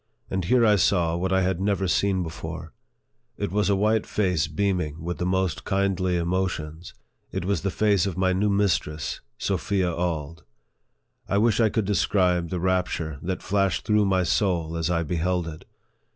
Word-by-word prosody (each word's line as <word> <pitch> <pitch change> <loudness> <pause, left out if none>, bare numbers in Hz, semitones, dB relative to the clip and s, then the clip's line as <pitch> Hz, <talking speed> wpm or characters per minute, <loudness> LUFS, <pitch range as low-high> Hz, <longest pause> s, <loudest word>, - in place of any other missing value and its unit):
And 95 -2 -1
here 120 +5 +4
I 105 -2 +5
saw 85 -3 +2
what 95 +2 -1
I 95 0 +3
had 95 -1 0
never 100 -1 +1
seen 95 +1 +1
before; 80 0 -7 0.6
it - - -3
was 105 +1 +1
a 100 - +4
white 110 +2 +1
face 90 -7 +1
beaming 80 -2 -1
with 90 +1 -4
the 90 - -1
most 95 -1 0
kindly 95 -2 0
emotions; 85 -2 -3 0.4
it 95 -1 -3
was 100 -3 0
the 100 - -1
face 100 -1 +2
of 95 -3 -4
my 95 0 +2
new 100 +3 +1
mistress, 90 -7 0 0.2
Sophia 95 -4 0
Auld. 80 -2 -3 0.9
I 100 - +2
wish 110 +1 +3
I 110 -2 +4
could 110 -1 -1
describe 90 -2 +1
the 90 - -2
rapture 90 -5 -1
that 95 +1 -3
flashed 100 -2 0
through 105 -1 +3
my 95 -1 +2
soul 85 -3 0
as 80 0 -1
I 85 -1 +1
beheld 90 +1 -1
it. 80 -1 -8
90 Hz, 175 wpm, -25 LUFS, 85-100 Hz, 0.9 s, I